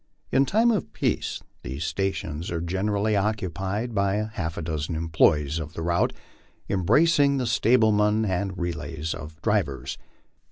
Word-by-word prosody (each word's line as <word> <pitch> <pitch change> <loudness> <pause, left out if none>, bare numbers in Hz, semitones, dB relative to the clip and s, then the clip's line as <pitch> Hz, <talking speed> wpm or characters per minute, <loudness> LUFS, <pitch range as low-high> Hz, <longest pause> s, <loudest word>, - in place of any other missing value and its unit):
In 135 +1 +3
time 230 +3 +4
of 210 -6 -2
peace - - -1 0.2
these 65 +5 -5
stations 85 -3 -2
are 85 - -2
generally 100 +5 0
occupied 100 +2 -1
by 105 +1 0
half 80 -6 -3
a - - -2
dozen 80 +1 -3
employees 80 -2 +2
of 80 0 -6
the 80 - -5
route, 85 +1 +2 0.6
embracing 140 - +3
the 130 - 0
stablemen 110 -2 +3
and 95 -1 -1
relays 80 -2 -3
of 80 0 -9
drivers. 100 -11 -1
95 Hz, 135 wpm, -25 LUFS, 80-110 Hz, 0.6 s, time